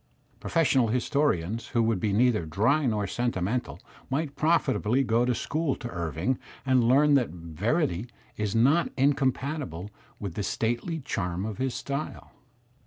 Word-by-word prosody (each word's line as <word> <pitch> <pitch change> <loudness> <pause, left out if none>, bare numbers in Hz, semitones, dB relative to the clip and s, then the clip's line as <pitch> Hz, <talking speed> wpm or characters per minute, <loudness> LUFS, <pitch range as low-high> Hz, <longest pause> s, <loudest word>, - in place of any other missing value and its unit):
Frofessional 135 -8 +2
historians 120 - 0
who 115 -3 +1
would 110 -3 +1
be 105 +2 0
neither 115 -1 +3
dry 120 - +2
nor 105 -3 0
sentimental 120 0 -2 0.3
might 140 +1 -2
profitably 135 -6 +2
go 120 0 +2
to 125 -1 +1
school 155 +1 -1
to 120 - -7
Irving 85 - -2 0.3
and 130 -2 +4
learn 145 +3 +5
that 130 -4 +3
verity 90 - -1 0.3
is 105 0 -2
not 140 +9 +4
incompatible 135 - 0 0.3
with 100 -5 -5
the 105 - -3
stately 120 - -2
charm 90 -5 -2
of 110 -2 -5
his 130 -1 -1
style. 140 +2 -5
120 Hz, 140 wpm, -27 LUFS, 105-140 Hz, 0.3 s, learn